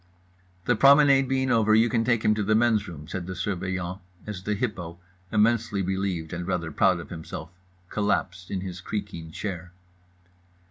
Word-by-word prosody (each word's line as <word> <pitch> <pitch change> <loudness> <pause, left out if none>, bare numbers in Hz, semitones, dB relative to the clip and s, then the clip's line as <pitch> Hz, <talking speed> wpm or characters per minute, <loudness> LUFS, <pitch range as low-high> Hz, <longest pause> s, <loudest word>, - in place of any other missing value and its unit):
"The 125 - +3
promenade 140 +2 +6
being 130 -1 +1
over, 110 -1 +4
you 115 +2 +5
can 115 0 +1
take 115 -1 +1
him 105 - +5
to 105 - -1
the 110 +1 +2
men's 110 -2 +3
room," 75 -3 -9
said 90 0 -5
the 95 - -5
Surveillant, 95 -1 -3 0.3
as 105 -3 -6
the 105 +2 -1
Hippo 95 -7 -4 0.3
(immensely 110 -2 +2
relieved 95 -3 -2
and 90 0 -4
rather 85 -4 -2
proud 90 +3 +3
of 85 - -10
himself) 80 -1 -7 0.4
collapsed 95 -3 -1
in 95 - -2
his 90 -2 -6
creaking 100 -5 -5
chair. 90 0 -6
95 Hz, 170 wpm, -26 LUFS, 90-110 Hz, 0.4 s, promenade